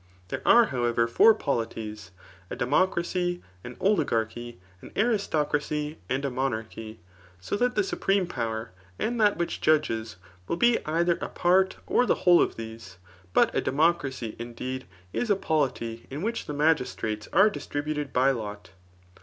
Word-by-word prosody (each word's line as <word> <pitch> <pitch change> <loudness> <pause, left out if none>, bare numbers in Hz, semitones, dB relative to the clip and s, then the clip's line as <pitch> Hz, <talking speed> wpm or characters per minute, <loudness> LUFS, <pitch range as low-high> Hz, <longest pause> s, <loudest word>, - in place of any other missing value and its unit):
There - - -4
are, 235 0 +7
however, 120 -2 +1
four 215 - +6
poKties, 110 - -3 0.4
a - - -4
democracy, 175 +5 0 0.2
an 125 +1 -9
oligarchy, 120 - 0 0.2
an - - -12
aristocracy, 150 -8 0
and 135 +2 -1
a 140 - -1
monarchy; 110 -4 -4 0.4
sothatth« 245 - 0
supreme 200 - +1
power 115 - -4 0.3
and 235 0 -1
that 205 -1 +4
which 170 0 -3
judges, 115 -8 +1 0.3
will - - -1
be 240 +4 +3
either 170 +2 +1
a - - -3
part 190 +2 +2
or 250 - +2
.the - - +3
whole 175 -1 +7
of - - 0
these. 110 -5 -9 0.3
But - - +3
a - - +1
democracy, 135 -6 0
indeed, 125 +2 -5 0.3
is 240 - -1
a 205 - +5
polity 130 -10 -2
in 145 +6 -5
which 230 +2 -2
the 150 - -4
magistrates 125 -8 0
are 215 - +5
distributed 150 -5 -4
by 130 +2 +3
lot. 105 -6 -6
145 Hz, 145 wpm, -27 LUFS, 115-180 Hz, 0.4 s, are